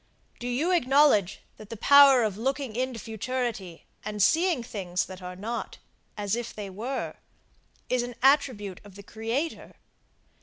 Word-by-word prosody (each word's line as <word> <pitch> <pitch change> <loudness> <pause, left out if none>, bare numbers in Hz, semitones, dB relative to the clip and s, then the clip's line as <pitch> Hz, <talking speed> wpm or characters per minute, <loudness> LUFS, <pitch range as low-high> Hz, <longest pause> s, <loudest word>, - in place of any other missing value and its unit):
Do 245 - -5
you 275 +9 0
acknowledge 270 - +3 0.2
that 215 - -13
the 230 - -7
power 275 +1 +7
of 210 -3 -1
looking 265 +1 -3
into 255 0 -2
futurity 225 -5 -4 0.2
and 210 0 -5
seeing 325 - +3
things 180 -5 -3
that 185 0 -10
are 180 0 -7
not, 225 +6 -5 0.4
as 205 0 -1
if 235 -1 -6
they 205 -2 -6
were, 240 +8 -4 0.7
is 250 -1 +1
an 245 0 -6
attribute 255 -9 +2
of 205 -2 -15
the 200 - -11
Creator? 230 +10 -4
230 Hz, 150 wpm, -27 LUFS, 205-265 Hz, 0.7 s, power